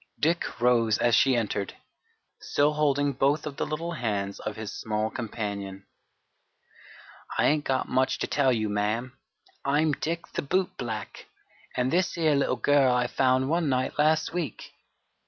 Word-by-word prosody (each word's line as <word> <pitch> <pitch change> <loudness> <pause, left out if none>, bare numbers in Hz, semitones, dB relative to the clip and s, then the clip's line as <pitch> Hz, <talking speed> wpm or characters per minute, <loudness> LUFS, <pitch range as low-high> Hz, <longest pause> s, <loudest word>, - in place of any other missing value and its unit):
Dick 165 -2 0
rose 115 -3 +3
as 120 - +2
she 130 +2 +5
entered, 105 -4 -2 0.6
still 145 +1 +1
holding 145 -1 +1
both 140 +3 +1
of 145 -2 -6
the - - -1
little 165 +3 -3
hands 105 -9 -2
of 110 - -5
his 110 -2 -6
small 110 0 -2
companion. 100 -5 -5 1.5
"I - - +3
ain't 150 0 +2
got 130 -1 0
much 130 +1 +1
to - - -2
tell 140 -3 +2
you, 110 -3 0
ma'am. 105 +5 -1 0.5
I'm 150 +3 +2
Dick 165 +3 -3
the - - -1
boot 185 +6 0
black, - - -6 0.5
an' 125 0 +1
this 180 +4 +1
here 160 -3 +2
little 140 -2 +1
girl 135 +2 +3
I 125 0 +2
found 130 +1 +2
one 165 0 +1
night 130 +2 -1
last 155 +2 +2
week. 170 -5 -4
130 Hz, 155 wpm, -27 LUFS, 115-150 Hz, 1.5 s, she